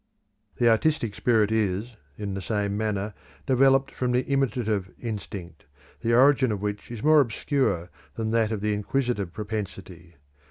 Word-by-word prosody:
The 120 - +2
artistic 115 -1 +2
spirit 110 -2 +2
is, 110 +2 -1 0.2
in 100 -2 -4
the 95 - -4
same 100 0 -1
manner, 105 -1 -2 0.3
developed 135 0 +4
from 125 -1 -1
the 125 +1 +2
imitative 120 -8 0
instinct, 100 -7 -7 0.3
the 115 0 +1
origin 130 -1 +5
of 105 - -2
which 105 0 -4
is 115 -3 -7
more 155 -1 +6
obscure 110 - -1 0.2
than 110 -1 -2
that 115 -1 +2
of 110 -3 -2
the 105 0 0
inquisitive 105 -2 -1
propensity. 95 -5 -6
110 Hz, 150 wpm, -26 LUFS, 100-125 Hz, 0.3 s, more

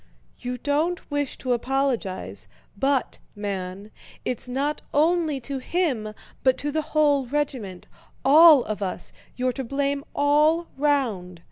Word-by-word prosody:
"You 250 0 -4
don't 300 +7 -1
wish 290 -2 -1
to 255 -1 -1
apologize, 250 -5 -2 0.3
but, 270 -2 0 0.2
man, 200 0 -5 0.3
it's 250 0 -3
not 280 +4 -1
only 315 -1 +2
to 270 +2 -4
him 255 -9 -1 0.3
but 260 -1 +4
to 290 - -3
the 315 +2 0
whole 295 -3 +2
regiment—all 275 - +3
of 210 -2 -4
us—you're 245 +6 -4
to 265 - -4
blame 280 +2 -1
all 300 +4 +3
round. 240 - 0
270 Hz, 120 wpm, -24 LUFS, 235-295 Hz, 0.3 s, but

